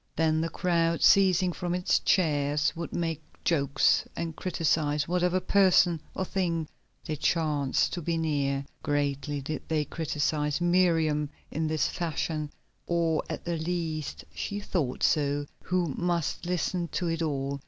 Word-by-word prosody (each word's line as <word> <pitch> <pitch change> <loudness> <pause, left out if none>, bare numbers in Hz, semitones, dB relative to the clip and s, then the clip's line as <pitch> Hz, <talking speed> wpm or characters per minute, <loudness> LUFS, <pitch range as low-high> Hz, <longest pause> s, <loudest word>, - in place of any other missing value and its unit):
Then 160 -1 +2
the 165 - -1
crowd, 170 0 +1
ceasing 185 -2 +5
from 175 0 -2
its 180 0 +2
cheers, 150 -4 +2
would 170 0 -5
make 165 -2 -2 0.2
jokes, 140 -3 +3
and 165 -1 -4
criticise 150 -4 0
whatever 180 +1 +1
person 185 -3 +4
or 190 - -1
thing 170 -5 -1 0.4
they 155 - -2
chanced 150 -3 +1
to 175 - -3
be 165 +1 -1
near. 140 -3 0 0.2
Greatly 145 0 -1
did 150 +3 -4
they 155 -1 0
criticise 150 -1 -1
Miriam 165 -4 +2 0.2
in 160 +1 -1
this 155 0 +1
fashion, 155 -2 -2 0.4
or 165 -2 +1
at - - -5
the 170 -1 -1
least 160 -2 -3
she 205 0 -4
thought 165 -10 -2
so, 145 -1 +2 0.2
who 180 -5 0
must 175 -1 -1
listen 180 0 -1
to 175 - -2
it 165 0 -1
all. 140 -3 -2
160 Hz, 145 wpm, -28 LUFS, 150-175 Hz, 0.4 s, ceasing